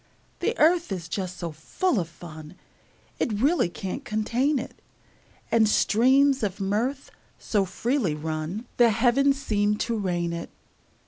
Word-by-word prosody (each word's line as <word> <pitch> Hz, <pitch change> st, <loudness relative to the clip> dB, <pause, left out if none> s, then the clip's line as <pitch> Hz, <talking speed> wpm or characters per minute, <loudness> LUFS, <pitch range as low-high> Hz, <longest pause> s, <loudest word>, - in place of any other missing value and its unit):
The 470 Hz, -, -1 dB
earth 335 Hz, -, +3 dB
is 175 Hz, -4 st, -4 dB
just 185 Hz, +1 st, -4 dB
so 170 Hz, -1 st, -4 dB
full 225 Hz, -, -1 dB
of 165 Hz, -2 st, -3 dB
fun 160 Hz, -1 st, -11 dB, 0.6 s
It -, -, 0 dB
really 285 Hz, -, +2 dB
can't 190 Hz, -, -5 dB
contain 240 Hz, +6 st, 0 dB
it; 250 Hz, -, -7 dB, 0.7 s
And 220 Hz, -2 st, +4 dB
streams 265 Hz, +6 st, +4 dB
of 200 Hz, -2 st, -2 dB
mirth 225 Hz, +8 st, -1 dB, 0.3 s
so 205 Hz, -3 st, 0 dB
freely 225 Hz, -, -1 dB
run 155 Hz, +7 st, -4 dB
The 240 Hz, -1 st, +6 dB
heavens 260 Hz, +5 st, +3 dB
seem 210 Hz, -5 st, +1 dB
to 230 Hz, +2 st, -1 dB
rain 175 Hz, -5 st, -1 dB
it. 170 Hz, -, -5 dB
215 Hz, 140 wpm, -26 LUFS, 175-265 Hz, 0.7 s, The